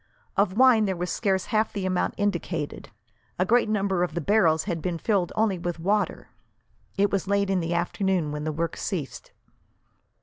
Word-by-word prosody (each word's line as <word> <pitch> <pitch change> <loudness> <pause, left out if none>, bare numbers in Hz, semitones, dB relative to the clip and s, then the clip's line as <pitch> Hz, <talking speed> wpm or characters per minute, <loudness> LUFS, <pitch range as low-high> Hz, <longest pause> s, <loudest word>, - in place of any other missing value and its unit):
Of 200 0 +1
wine 250 -4 +6
there 190 -2 -1
was 180 +1 -3
scarce 190 -4 0
half 215 0 0
the 200 -2 -3
amount 185 -1 0
indicated. 175 -6 -2 0.5
A 185 - +2
great 235 +2 +3
number 195 -4 0
of 175 -2 -1
the - - 0
barrels 165 -3 +3
had 170 -5 -3
been 175 -1 -2
filled 190 -1 0
only 215 -4 +1
with 175 0 -3
water. 200 +5 -1 0.7
It 200 0 +2
was 195 -1 -1
late 200 0 +1
in 190 - +2
the 170 0 -2
afternoon 175 -2 0
when 150 0 -4
the 155 - -1
work 165 +2 -3
ceased. 165 -9 -5
185 Hz, 180 wpm, -26 LUFS, 170-205 Hz, 0.7 s, wine